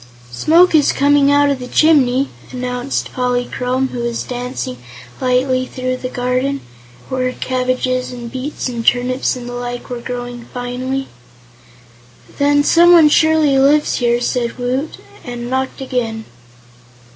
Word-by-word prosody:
"Smoke 330 Hz, -, +4 dB
is 300 Hz, -3 st, +4 dB
coming 285 Hz, 0 st, +3 dB
out 285 Hz, 0 st, +4 dB
of 275 Hz, -, -2 dB
the 250 Hz, -, -7 dB
chimney," 275 Hz, -3 st, +3 dB, 0.2 s
announced 250 Hz, +1 st, -3 dB
Polychrome, 250 Hz, +1 st, -1 dB
who 245 Hz, -, -6 dB
was 235 Hz, -1 st, -2 dB
dancing 245 Hz, -, -5 dB, 0.4 s
lightly 255 Hz, 0 st, +1 dB
through 255 Hz, 0 st, -3 dB
the 255 Hz, -, -5 dB
garden, 255 Hz, +3 st, -1 dB, 0.5 s
where 255 Hz, -1 st, -1 dB
cabbages 255 Hz, 0 st, -1 dB
and 240 Hz, -2 st, -8 dB
beets 265 Hz, +3 st, -4 dB
and 235 Hz, -2 st, -4 dB
turnips 250 Hz, +3 st, +1 dB
and 245 Hz, -1 st, -8 dB
the 245 Hz, -, -6 dB
like 245 Hz, 0 st, -6 dB
were 240 Hz, -1 st, -4 dB
growing 245 Hz, -1 st, -6 dB
finely. 255 Hz, +2 st, -4 dB, 1.3 s
"Then 290 Hz, 0 st, +3 dB
someone 340 Hz, -1 st, +6 dB
surely 310 Hz, -3 st, +3 dB
lives 290 Hz, +2 st, +3 dB
here," 240 Hz, -1 st, +1 dB
said 240 Hz, -1 st, -1 dB
Woot, 255 Hz, +5 st, -2 dB, 0.3 s
and 240 Hz, -1 st, -6 dB
knocked 265 Hz, +1 st, -2 dB
again. 230 Hz, -4 st, -3 dB
255 Hz, 135 wpm, -17 LUFS, 245-275 Hz, 1.3 s, someone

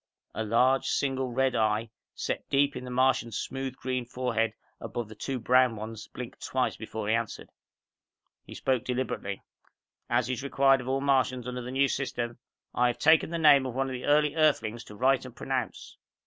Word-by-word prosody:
The -, -, -3 dB
large, 125 Hz, +5 st, +3 dB
single 135 Hz, -2 st, 0 dB
red 130 Hz, +1 st, +1 dB
eye 110 Hz, 0 st, +1 dB, 0.2 s
set -, -, -4 dB
deep 140 Hz, 0 st, +2 dB
in 125 Hz, -, -6 dB
the -, -, -7 dB
Martian's 125 Hz, -2 st, +1 dB
smooth, 135 Hz, -1 st, -4 dB
green 130 Hz, -1 st, -2 dB
forehead 120 Hz, -3 st, -1 dB, 0.3 s
above 120 Hz, -3 st, -5 dB
the -, -, -9 dB
two 130 Hz, +5 st, -4 dB
brown 125 Hz, 0 st, +4 dB
ones 110 Hz, 0 st, -7 dB
blinked -, -, -9 dB
twice -, -, 0 dB
before 110 Hz, -2 st, -6 dB
he 110 Hz, -, +2 dB
answered. 115 Hz, -2 st, -3 dB, 0.9 s
He -, -, -11 dB
spoke 130 Hz, -3 st, 0 dB
deliberately. 125 Hz, -6 st, -3 dB, 0.7 s
"As 120 Hz, -1 st, +2 dB
is 130 Hz, 0 st, -2 dB
required 135 Hz, -1 st, +3 dB
of 125 Hz, -, -9 dB
all 135 Hz, +1 st, 0 dB
Martians 130 Hz, -3 st, +1 dB
under 125 Hz, 0 st, -4 dB
the 125 Hz, -, -6 dB
New 135 Hz, +2 st, +2 dB
System, 120 Hz, -3 st, -3 dB, 0.3 s
I 125 Hz, -, +3 dB
have 120 Hz, 0 st, -1 dB
taken 160 Hz, +3 st, +4 dB
the 170 Hz, -, -2 dB
name 145 Hz, -4 st, +6 dB
of 125 Hz, -, -6 dB
one 135 Hz, 0 st, 0 dB
of -, -, -4 dB
the 125 Hz, -, -5 dB
early 150 Hz, 0 st, +3 dB
Earthlings 120 Hz, -8 st, +2 dB
to 105 Hz, -, -11 dB
write 130 Hz, +3 st, +2 dB
and 130 Hz, -2 st, -10 dB
pronounce." 130 Hz, -1 st, -4 dB
125 Hz, 190 wpm, -28 LUFS, 115-135 Hz, 0.9 s, name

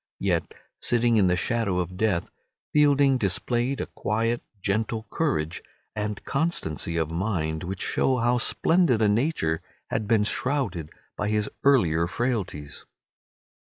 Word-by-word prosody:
Yet, 90 Hz, -4 st, -1 dB, 0.2 s
sitting 120 Hz, -1 st, +2 dB
in 100 Hz, -3 st, +4 dB
the 90 Hz, -, +3 dB
shadow 100 Hz, -1 st, 0 dB
of 90 Hz, 0 st, -2 dB
death, 95 Hz, -3 st, 0 dB, 0.5 s
Fielding 140 Hz, -3 st, +4 dB
displayed 120 Hz, +6 st, 0 dB
a -, -, -1 dB
quiet, 115 Hz, +2 st, -1 dB, 0.2 s
gentle 110 Hz, +3 st, -1 dB
courage 85 Hz, -, -1 dB, 0.3 s
and 105 Hz, -1 st, -3 dB
constancy 85 Hz, -, -1 dB
of 80 Hz, -1 st, -1 dB
mind, 80 Hz, -3 st, -1 dB
which 95 Hz, +2 st, -4 dB
show 130 Hz, -1 st, +1 dB
how 120 Hz, +1 st, +2 dB
splendid 165 Hz, -4 st, +3 dB
a -, -, +5 dB
nature 105 Hz, -, +1 dB, 0.3 s
had 110 Hz, -2 st, -1 dB
been 110 Hz, -2 st, +3 dB
shrouded 105 Hz, -, -1 dB, 0.3 s
by 105 Hz, -, -2 dB
his 105 Hz, -1 st, 0 dB
earlier 85 Hz, -, +4 dB
frailties. 95 Hz, -, -3 dB
105 Hz, 130 wpm, -26 LUFS, 90-125 Hz, 0.5 s, a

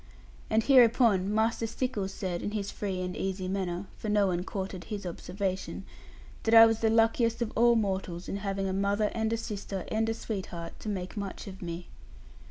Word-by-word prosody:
And 220 Hz, +1 st, +3 dB
hereupon 230 Hz, -7 st, +5 dB
Master 225 Hz, +1 st, +1 dB
Stickles 220 Hz, -5 st, -2 dB
said, 180 Hz, -3 st, -3 dB
in 205 Hz, -, -3 dB
his 200 Hz, -2 st, -2 dB
free 190 Hz, -3 st, -3 dB
and 180 Hz, 0 st, -3 dB
easy 190 Hz, -1 st, -2 dB
manner 185 Hz, -1 st, -2 dB
(for 215 Hz, -, -4 dB
no 210 Hz, -1 st, +4 dB
one 180 Hz, -2 st, 0 dB
courted 190 Hz, -1 st, -5 dB
his 205 Hz, -3 st, -5 dB
observation), 185 Hz, +2 st, -4 dB, 0.6 s
that 225 Hz, 0 st, +3 dB
I 225 Hz, 0 st, +11 dB
was 225 Hz, -1 st, +2 dB
the 225 Hz, -, +2 dB
luckiest 230 Hz, +1 st, +3 dB
of 220 Hz, -, -5 dB
all 235 Hz, +1 st, +5 dB
mortals 190 Hz, -5 st, -1 dB
in 195 Hz, -, -3 dB
having 195 Hz, -1 st, -2 dB
a 190 Hz, -, -1 dB
mother, 200 Hz, +2 st, +1 dB
and 220 Hz, -1 st, 0 dB
a 230 Hz, -, +1 dB
sister, 205 Hz, -4 st, -5 dB
and 220 Hz, +1 st, +1 dB
a 225 Hz, -, -1 dB
sweetheart, 185 Hz, -7 st, -6 dB
to 215 Hz, -, -5 dB
make 185 Hz, -1 st, -4 dB
much 200 Hz, -2 st, -5 dB
of 190 Hz, -1 st, -9 dB
me. 170 Hz, 0 st, -5 dB
200 Hz, 190 wpm, -29 LUFS, 190-225 Hz, 0.6 s, I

